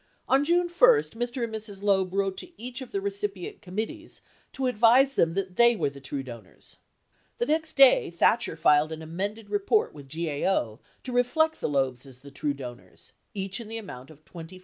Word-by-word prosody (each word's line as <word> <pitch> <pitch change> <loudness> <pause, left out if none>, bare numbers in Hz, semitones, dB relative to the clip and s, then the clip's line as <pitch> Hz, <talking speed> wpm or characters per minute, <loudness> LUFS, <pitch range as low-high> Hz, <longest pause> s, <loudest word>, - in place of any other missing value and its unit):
On 270 +2 +3
June 345 +3 +2
1, - - -13
Mr. 315 - +2
and 230 -1 -4
Mrs. 210 -2 -6
Loeb 190 -2 +2
wrote 195 0 -1
to 350 -1 -10
each 250 +3 -6
of 260 - -9
the 200 - -1
recipient 200 -1 -4
committees 220 - -6 0.3
to 265 - -3
advise 250 +3 +4
them 165 0 +2
that 190 -2 -3
they 235 0 +6
were 150 -8 -1
the 140 0 -13
true 135 0 -4
donors. 115 -7 -12 0.6
The 240 - 0
next 315 +3 0
day, 275 -2 +6
Thatcher 170 +3 +1
filed 155 -1 +3
an 160 0 -6
amended 200 +7 -5
report 415 +2 +1
with 140 -3 -13
GAO 150 - -1 0.2
to 255 - -6
reflect 315 +6 +1
the - - -1
Loebs 135 -2 -1
as 130 -1 -15
the 140 - -13
true 140 +1 -2
donors, 120 -9 -11 0.2
each 195 +2 -3
in 225 - -9
the 225 +1 -5
amount 135 - -9
of 155 -1 -17
$24,000. 170 +1 -11
195 Hz, 195 wpm, -26 LUFS, 155-245 Hz, 0.6 s, they